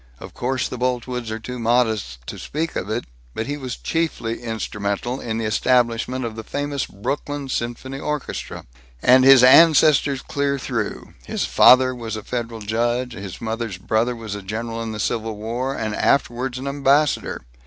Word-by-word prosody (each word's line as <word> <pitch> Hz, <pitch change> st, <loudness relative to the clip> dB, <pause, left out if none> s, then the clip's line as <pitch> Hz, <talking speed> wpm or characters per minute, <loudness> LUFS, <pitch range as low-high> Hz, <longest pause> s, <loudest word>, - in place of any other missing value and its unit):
Of -, -, -11 dB
course 130 Hz, +1 st, -1 dB
the 125 Hz, -, -7 dB
Boltwoods 125 Hz, -1 st, -2 dB
are 110 Hz, -, -3 dB
too 125 Hz, +3 st, -7 dB
modest 110 Hz, -, 0 dB
to -, -, -7 dB
speak 160 Hz, +2 st, -3 dB
of 95 Hz, -, -3 dB
it, 110 Hz, +3 st, -2 dB, 0.3 s
but 110 Hz, -, -2 dB
he 145 Hz, -, -3 dB
was 130 Hz, -4 st, -5 dB
chiefly 160 Hz, -9 st, -2 dB
instrumental 110 Hz, +1 st, -3 dB
in 110 Hz, -1 st, -3 dB
the 115 Hz, -, -2 dB
establishment 120 Hz, +2 st, +1 dB
of 115 Hz, -2 st, -5 dB
the 110 Hz, -, -6 dB
famous 145 Hz, +2 st, -3 dB
Brooklyn 140 Hz, +6 st, -4 dB
Symphony 130 Hz, +2 st, -3 dB
Orchestra. 150 Hz, -1 st, -4 dB, 0.4 s
And 130 Hz, +1 st, +6 dB
his 135 Hz, -1 st, +8 dB
ancestors 145 Hz, -1 st, +6 dB
clear 140 Hz, -1 st, -1 dB
through 120 Hz, -5 st, -4 dB
his -, -, -1 dB
father 130 Hz, 0 st, +6 dB
was 115 Hz, -2 st, -5 dB
a 110 Hz, -, -6 dB
federal 115 Hz, -2 st, -4 dB
judge, 120 Hz, +3 st, -1 dB
and 100 Hz, -, -8 dB
his 95 Hz, -3 st, -7 dB
mother's 115 Hz, -3 st, -3 dB
brother 110 Hz, +5 st, 0 dB
was 110 Hz, -3 st, -6 dB
a 105 Hz, -, -5 dB
general 115 Hz, +4 st, -4 dB
in 115 Hz, -1 st, -4 dB
the 105 Hz, -, -6 dB
Civil 110 Hz, 0 st, -2 dB
War, 120 Hz, +5 st, -3 dB
and 110 Hz, -1 st, -3 dB
afterwards 125 Hz, +1 st, +1 dB
an 130 Hz, -, -6 dB
ambassador. 140 Hz, -, +1 dB
120 Hz, 175 wpm, -22 LUFS, 110-130 Hz, 0.4 s, his